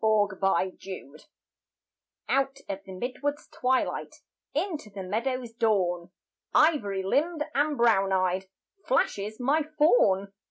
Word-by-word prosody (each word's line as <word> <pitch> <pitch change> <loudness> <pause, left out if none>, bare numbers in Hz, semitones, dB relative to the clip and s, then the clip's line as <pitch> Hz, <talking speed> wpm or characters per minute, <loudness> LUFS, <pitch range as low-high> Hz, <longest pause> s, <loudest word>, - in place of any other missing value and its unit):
IN - - +4
THE 205 -2 +3
FOREST 190 -5 -2 1.0
OUT 275 0 +1
of 195 -1 -4
the - - -8
mid 245 +7 -5
wood's 290 +1 -2
twilight 255 +1 -1 0.4
Into 320 - -2
the 195 -1 -7
meadow's 240 +5 -2
dawn, 185 -7 +1 0.5
Ivory 205 -12 +3
limbed 300 - +1
and 290 +1 +1
brown 220 -5 +4
eyed, 185 0 +1 0.3
Flashes 215 - 0
my 280 +6 +2
Faun! 245 -11 +3
220 Hz, 120 wpm, -28 LUFS, 190-275 Hz, 1.0 s, IN